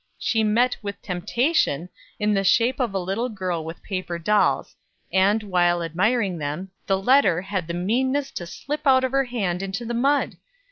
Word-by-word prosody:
She 225 -2 0
met 235 +4 +2
with 200 -1 -6
temptation 180 - 0 0.3
in 210 0 +1
the 195 -1 +1
shape 235 +7 +3
of 235 -6 -1
a - - +1
little 195 +7 -2
girl 185 -6 -3
with 165 +1 -8
paper 185 -3 -4
dolls; 210 +5 +1 0.4
and, 200 +3 +3
while 175 -3 +2
admiring 185 +2 0
them, 155 +6 -4 0.2
the 195 - +2
letter 200 -5 +4
had 190 -4 -3
the 170 - -3
meanness 260 +9 0
to 175 - -6
slip 290 - -5
out 260 -1 +5
of 260 - 0
her 270 0 +2
hand 195 -8 -2
into 195 +4 -4
the 235 - -3
mud! 275 +5 +1
200 Hz, 180 wpm, -23 LUFS, 180-245 Hz, 0.4 s, out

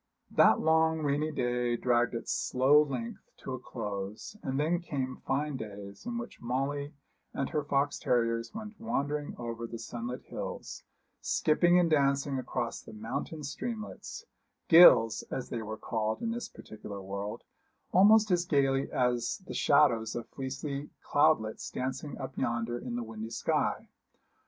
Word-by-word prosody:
That - - +5
long 160 0 +3
rainy 145 +2 +1
day 120 -3 0
dragged 120 0 +2
its 115 - -2
slow 135 +4 +4
length 130 -6 -4 0.2
to 130 - -6
a 130 - -4
close; 105 - -6
and 135 0 -2
then 165 +4 +2
came 135 -6 -4
fine 145 +1 0
days, 100 - -8
in 240 -1 -2
which 235 +1 -7
Molly 140 +4 -2 0.4
and 135 - -1
her 150 -2 0
fox 140 0 0
terriers 115 -1 +1
went 215 0 -8
wandering 145 -7 -2
over 115 -1 -5
the 115 - -6
sunlit 120 +2 -6
hills, - - -6 0.4
skipping 175 +3 +3
and 175 -1 +4
dancing 140 -2 +2
across - - -3
the - - -12
mountain 115 +8 -5
streamlets 220 - -6 0.4
gills, 115 -10 +8
as 130 - -4
they 115 - -3
were 110 0 -5
called 110 - -2
in 230 - 0
this 240 +1 -4
particular 105 -2 -9
world 100 +2 -5 0.5
almost 210 +3 +6
as 175 -1 +3
gaily 135 -4 +1
as 125 +5 0
the - - -7
shadows 120 -7 +3
of 120 -1 -4
fleecy 140 +2 -5
cloudlets 145 -7 +2
dancing 130 +3 -4
up 130 -1 -6
yonder 120 -1 -1
in 120 -1 -5
the 120 - -2
windy 110 0 -6
sky. 115 - 0
130 Hz, 150 wpm, -30 LUFS, 115-150 Hz, 0.5 s, gills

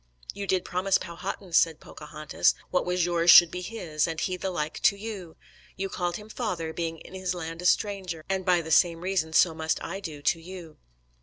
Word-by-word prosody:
"You 200 0 -6
did 185 -2 +1
promise 185 +2 +1
Powhatan," 180 +1 -7
said 165 -1 +3
Pocahontas, 155 -1 -1 0.2
"what 180 - 0
was 180 -1 +1
yours 170 -1 +1
should 175 -1 +10
be 180 - -5
his, 175 -7 -2
and 160 -1 -4
he 185 - -1
the 190 +1 -3
like 155 -4 -3
to 200 - +4
you. 200 -6 -7 0.4
You 195 +1 -3
called 175 -2 -2
him 210 +2 -8
father, 180 -9 -3
being 165 0 -3
in 175 - -14
his 185 -1 -3
land 165 0 -6
a 180 - +1
stranger, 185 -6 0
and 190 -1 -1
by 180 -2 +3
the 160 - -7
same 165 0 +4
reason 180 -3 -1
so 165 +1 +4
must 160 0 -1
I 190 +4 -5
do 155 -7 -8
to 165 - +2
you." 175 -3 -10
175 Hz, 210 wpm, -27 LUFS, 165-190 Hz, 0.4 s, should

